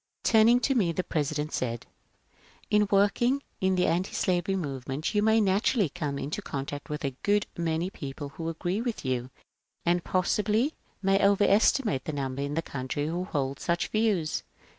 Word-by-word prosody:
' - - -55
" - - -55
TurniDg 235 +2 +5
to 275 - +3
me 200 -10 +2
the 180 +2 -2
President 150 -1 -2
said, 120 -2 -2 0.4
" - - -30
In 210 -1 +4
work 200 +2 +3
ing 265 +4 +2 0.2
in 190 0 +2
the 180 - +2
antislavery 180 +1 0
moyement 140 - -3
you 210 - +3
may 220 +1 +4
naturaUy 200 - +2
come 150 -5 -3
in 140 - -4
contact 145 -1 -5
with 150 +1 -3
a 135 - -2
good 205 0 +2
many 170 +2 -1
people 140 -2 -6
who 165 +4 -5
agree 175 +5 -2
with 235 - -4
you, 130 -1 -1 0.6
and 175 0 +2
possibly 210 - +1 0.3
may 195 0 +3
OYcrestimate 200 - +3
the 155 - -3
number 135 -1 -3
in 140 +1 -2
the 165 - 0
country 140 +2 -3
who 175 +4 -2
hold 140 -6 -2
such 170 0 -1
views. 210 -8 +1
175 Hz, 180 wpm, -28 LUFS, 145-205 Hz, 0.6 s, TurniDg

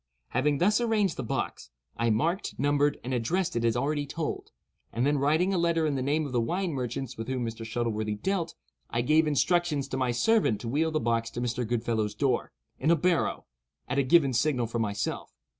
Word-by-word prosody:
Having 145 +3 +1
thus 210 - +3
arranged 215 -6 +1
the - - -4
box, 110 - -3 0.3
I 115 0 +1
marked, 165 - 0
numbered, 145 +1 +2
and 130 - -3
addressed 160 +10 0
it 115 - 0
as 115 0 +2
already 145 +2 -1
told; 160 +2 -4 0.4
and 120 +3 0
then 145 0 +2
writing 160 +7 +2
a 185 - +1
letter 170 -1 +2
in 150 - +1
the 135 - -1
name 150 +4 +1
of 140 - -5
the 120 -2 +1
wine 175 +7 -1
merchants 125 -2 -4
with 115 - -4
whom 130 -2 -2
Mr. 115 0 -5
Shuttleworthy 110 -2 -2
dealt, 170 - -2 0.3
I 120 - 0
gave 155 +5 +3
instructions 150 -1 +1
to 130 - -3
my 130 -1 0
servant 160 - +2
to 120 - -5
wheel 150 +7 +1
the 155 -1 0
box 115 -1 0
to 120 - -6
Mr. 120 -1 -2
Goodfellow's 110 -2 -1
door, 130 +1 0 0.3
in 150 - +1
a 170 - +6
barrow, 170 +2 0 0.4
at 135 +2 0
a - - +3
given 135 0 +4
signal 125 -1 +1
from 115 +1 -2
myself. 100 -2 -3
135 Hz, 210 wpm, -28 LUFS, 115-160 Hz, 0.4 s, a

